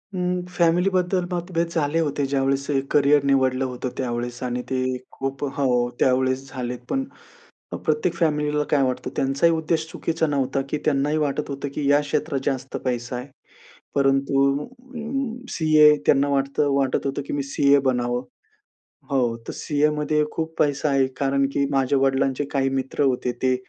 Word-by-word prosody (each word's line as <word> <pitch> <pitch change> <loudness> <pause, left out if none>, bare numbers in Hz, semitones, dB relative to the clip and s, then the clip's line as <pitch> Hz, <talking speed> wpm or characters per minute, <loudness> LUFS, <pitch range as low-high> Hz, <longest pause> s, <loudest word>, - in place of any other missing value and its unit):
उम्म, 180 0 0 0.2
फॅमिलीबद्दल 180 +1 +2
मतभेद 170 -1 -1
झाले 155 +1 +1
होते 145 -3 0
ज्यावेळेस 135 +1 0
हे 135 - +2
करिअर 145 0 +4
निवडलं 130 -1 +2
होतं 125 0 -4
त्यावेळेस 120 0 -3
आणि 125 0 -2
ते 130 -1 0 0.3
खूप 135 +1 -4
अ, - - -2
हो 125 -3 +2
त्यावेळेस 130 +1 +2
झालेत, 125 -2 -4
पण 270 0 0 0.7
अ, - - -3
प्रत्येक 155 +2 0
फॅमिलीला 150 -2 +1
काय 140 -2 +4
वाटतं 130 -1 -2
त्यांचाही 140 +5 +2
उद्देश 160 0 -1
चुकीचा 165 -1 -1
नव्हता 135 -1 0
की 150 - -1
त्यांनाही 150 +1 +1
वाटत 150 -1 -1
होतं 140 +1 -4
की 140 -1 0
या 145 +1 +5
क्षेत्रात 145 -1 -1
जास्त 135 -1 -2
पैसा 120 0 -2
आहे. 125 +3 -5 0.7
परंतु 135 0 +2 0.2
उम्म, 250 0 -5
सीए 155 -2 +5
त्यांना 140 +1 +4
वाटतं 140 +1 +1
वाटत 135 0 0
होतं 140 +1 -2
की - - -4
मी 140 -1 -1
सीए 140 +1 +3
बनावं. 120 0 0 0.9
हो, 120 -4 +1
तर - - -3
सीएमध्ये 150 0 +1
खूप 160 0 -4
पैसा 145 0 +1
आहे 135 -1 +3
कारण 140 0 +1
की 140 - +1
माझ्या 135 0 +2
वडिलांचे 135 +1 +1
काही 135 -1 +1
मित्र 135 +2 -1
होते. 125 -2 +1
ते 130 +1 0
140 Hz, 160 wpm, -23 LUFS, 135-155 Hz, 0.9 s, या